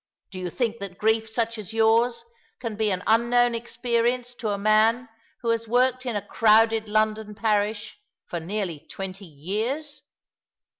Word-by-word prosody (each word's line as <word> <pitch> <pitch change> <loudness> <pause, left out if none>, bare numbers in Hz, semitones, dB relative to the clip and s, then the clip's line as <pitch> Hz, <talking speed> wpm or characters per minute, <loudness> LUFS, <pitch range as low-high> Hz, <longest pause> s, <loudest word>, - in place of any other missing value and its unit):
Do 185 - -7
you 180 -1 -3
think 235 +2 -2
that 195 -2 -7
grief 220 +1 +1
such 230 0 -1
as 215 +1 -6
yours 230 +1 +2 0.3
can 230 -3 -4
be 215 0 +1
an 185 -1 -1
unknown 235 +2 +3
experience 240 +1 -1
to 230 -3 -4
a 200 - -1
man 215 +4 +3 0.3
who 235 - -2
has 230 0 0
worked 255 +2 +2
in 235 - -2
a 205 -1 -3
crowded 220 0 +3
London 215 0 0
parish 210 -1 -1 0.3
for 175 - -4
nearly 175 -2 -3
twenty 195 +1 -7
years 220 - -4
220 Hz, 155 wpm, -25 LUFS, 210-235 Hz, 0.3 s, unknown